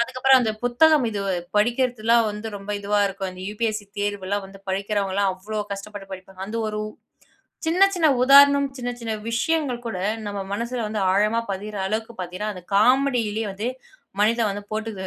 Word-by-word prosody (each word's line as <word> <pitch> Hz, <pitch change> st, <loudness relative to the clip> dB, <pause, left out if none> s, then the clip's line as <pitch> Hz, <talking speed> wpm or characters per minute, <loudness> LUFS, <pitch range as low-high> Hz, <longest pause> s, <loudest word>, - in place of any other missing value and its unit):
அதுக்கப்புறம் 255 Hz, +2 st, +4 dB
அந்த 225 Hz, -, +1 dB
புத்தகம் 275 Hz, +2 st, +4 dB
இது 205 Hz, -2 st, -3 dB, 0.4 s
படிக்கிறதுலாம் 235 Hz, 0 st, +2 dB
வந்து 210 Hz, +2 st, -6 dB
ரொம்ப 200 Hz, +1 st, -8 dB
இதுவா 205 Hz, +1 st, 0 dB
இருக்கும், 195 Hz, 0 st, -4 dB
அந்த 185 Hz, 0 st, -10 dB
UPSC 215 Hz, -1 st, -1 dB, 0.2 s
தேர்வெல்லாம் 205 Hz, -1 st, -2 dB
வந்து 195 Hz, 0 st, -14 dB
படிக்கிறவங்கலாம் 200 Hz, 0 st, 0 dB
அவ்வளோ 210 Hz, +3 st, -4 dB
கஷ்டப்பட்டு 200 Hz, 0 st, -8 dB
படிப்பாங்க, 190 Hz, 0 st, -10 dB
அந்த 225 Hz, +2 st, -4 dB
ஒரு 210 Hz, 0 st, -3 dB, 0.9 s
சின்ன, 360 Hz, +4 st, +4 dB
சின்ன 325 Hz, -3 st, +3 dB, 0.2 s
உதாரணம், 280 Hz, +1 st, +7 dB
சின்ன 245 Hz, 0 st, -3 dB
சின்ன 225 Hz, -1 st, -2 dB, 0.2 s
விஷயங்கள் 255 Hz, -1 st, 0 dB
கூட 185 Hz, -5 st, -4 dB, 0.3 s
நம்ம 200 Hz, -1 st, -4 dB
மனசுல 235 Hz, +2 st, -2 dB
வந்து 210 Hz, -1 st, -2 dB
ஆழமா 210 Hz, +4 st, +2 dB
பதியிற 205 Hz, +2 st, -6 dB
அளவுக்கு 220 Hz, +3 st, -3 dB
பார்த்தீங்கன்னா 185 Hz, +4 st, -4 dB
அந்த 180 Hz, -, -10 dB
காமெடிலயே 230 Hz, -2 st, +2 dB
வந்து 210 Hz, +5 st, -2 dB, 0.5 s
மனிதன் 225 Hz, 0 st, +3 dB
வந்து 205 Hz, +1 st, -6 dB
போட்டு 220 Hz, +1 st, -3 dB
215 Hz, 155 wpm, -23 LUFS, 200-240 Hz, 0.9 s, உதாரணம்